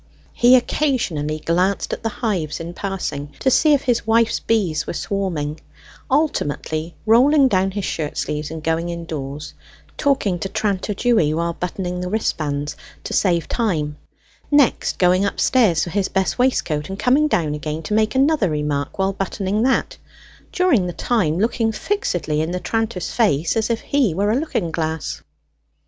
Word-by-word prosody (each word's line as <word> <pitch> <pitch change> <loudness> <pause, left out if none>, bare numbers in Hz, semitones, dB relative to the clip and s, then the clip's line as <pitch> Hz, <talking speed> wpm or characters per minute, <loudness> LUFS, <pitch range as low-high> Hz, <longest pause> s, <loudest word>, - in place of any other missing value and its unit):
He 245 +2 +6
occasionally 230 - 0
glanced 185 +4 +1
at - - -4
the 225 - -1
hives 190 - -2
in 170 +1 -6
passing, 150 -8 -4
to 265 - +1
see 305 +4 +5
if 280 - -2
his 240 -4 0
wife's 230 0 +3
bees 185 -9 0
were - - -3
swarming, 165 -7 -2 0.5
ultimately 165 - -1
rolling 265 +6 +5
down 190 -5 +2
his 195 0 -4
shirt 150 -3 -3
sleeves 150 0 -2
and 160 -1 -7
going 165 +1 0
indoors, 150 -4 -6 0.4
talking 260 - +1
to 195 - -3
tranter 200 0 -1
Dewy 205 -11 +2
whilst 170 0 -2
buttoning 180 0 -3
the 180 - -3
wristbands, 150 -8 -2 0.3
to - - -5
save 170 -4 +2
time; 160 -11 -1 0.5
next 290 -4 +3
going 185 +1 +3
upstairs 200 -4 +2
for 175 - -4
his 200 0 0
best 190 +5 -1
waistcoat, 170 - +1
and 195 - -5
coming 265 +8 +3
down 160 - 0
again 155 +1 -4
to 210 - -3
make 215 +1 +2
another 275 - +3
remark 150 -2 -2
whilst 195 0 -1
buttoning 195 +1 -1
that, 265 - +1 0.5
during 320 - +2
the 175 - -4
time 180 -10 0
looking 225 +2 +1
fixedly 175 - -1
in 160 - -2
the 180 +1 -2
tranter's 225 -3 -2
face 170 - +1
as 225 0 0
if 230 -1 -1
he 260 - +1
were 205 +3 +1
a - - +2
looking 245 - -1
glass. 160 -1 -3
190 Hz, 160 wpm, -21 LUFS, 160-230 Hz, 0.5 s, He